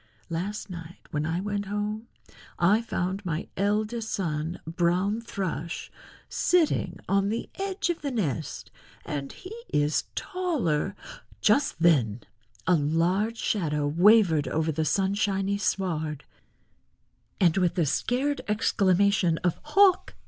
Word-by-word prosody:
Last 195 +6 -3
night 170 -2 -10
when 150 +1 -1
I 165 +3 -1
went 205 0 -2
home 210 +2 -3 0.5
I 200 +6 +4
found 190 -3 -2
my 165 -2 -3
eldest 215 +3 0
son, 165 -2 -2
Brown 180 +6 +1
Thrush, 185 -6 -4 0.4
sitting 310 - +1
on 195 +1 +2
the 225 +2 -3
edge 385 -2 -1
of 335 - -6
the 285 - -2
nest, 165 - -3 0.3
and 140 -2 -4
he 370 +4 -10 0.2
is 145 +1 +1
taller——" 240 - -1 0.4
Just 215 - +2
then 125 -10 +3 0.4
a - - +4
large 175 +8 +1
shadow 150 -11 0
wavered 170 - +5
over 160 +3 0
the 160 +1 -1
sunshiny 195 +1 +1
sward, 160 -6 -1 1.2
and 175 -3 +4
with 180 -2 +1
a 170 - +3
scared 265 - 0
exclamation 200 -4 +2
of 175 -2 0
"Hawk!" 370 +5 +3
190 Hz, 120 wpm, -27 LUFS, 165-215 Hz, 1.2 s, wavered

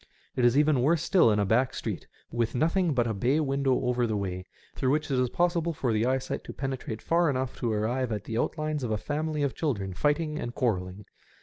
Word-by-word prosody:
It 125 - 0
is 120 +2 +4
even 150 -3 +4
worse 160 +4 +2
still 175 -8 +4
in 105 - +2
a 100 - +2
back 120 +6 +2
street, - - -4 0.2
with 120 0 -1
nothing 165 +3 +2
but 120 -2 +2
a 115 - -1
bay 125 +9 +1
window 135 -3 +1
over 125 -1 +1
the 110 -2 -1
way, 90 -2 -4 0.3
through 130 - -1
which 150 +1 0
it 130 - +2
is 125 -1 +1
possible 170 0 +1
for 125 -6 -1
the 110 +2 +1
eyesight 130 0 -1
to - - -7
penetrate 130 -5 -4
far 170 0 +3
enough 130 -1 -2
to 120 -3 0
arrive 115 +4 -1
at 105 -2 -3
the 110 - -5
outlines 155 -1 -1
of 120 - -2
a 110 - 0
family 150 +5 -2
of 140 -4 0
children 100 - -2
fighting 150 - 0
and 120 0 -5
quarrelling. 95 -4 -1
130 Hz, 225 wpm, -28 LUFS, 110-150 Hz, 0.3 s, is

